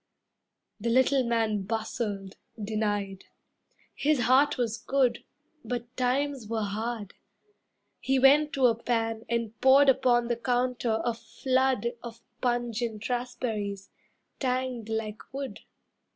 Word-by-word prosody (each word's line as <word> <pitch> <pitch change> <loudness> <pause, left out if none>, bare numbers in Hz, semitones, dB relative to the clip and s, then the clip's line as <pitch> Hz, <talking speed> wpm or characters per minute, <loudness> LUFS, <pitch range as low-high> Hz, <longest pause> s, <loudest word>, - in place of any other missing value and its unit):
The 230 +3 -1
little 260 +2 +4
man 225 -3 +1
Bustled, 205 -2 -3 0.2
denied, 205 -2 -2 0.7
his 295 -2 +1
heart 265 +5 +4
was 235 -2 -1
good, 255 -2 +1 0.4
But 245 0 -5
times 260 -1 0
were 220 -1 -1
hard. 215 0 -4 0.9
He 270 0 +1
went 290 +3 +5
to 265 -2 +3
a 240 - +6
pan 225 -1 -2
And 230 -2 -2
poured 270 +1 +7
upon 250 -3 +3
the 240 -1 -1
counter 245 -2 0
a 240 - +1
flood 255 0 0
Of 235 -1 -10 0.2
pungent 240 -3 -1
raspberries, 220 -5 -3 0.5
tanged 255 -3 -2
like 220 -1 -3
wood. 275 0 -5
235 Hz, 115 wpm, -28 LUFS, 220-255 Hz, 0.9 s, poured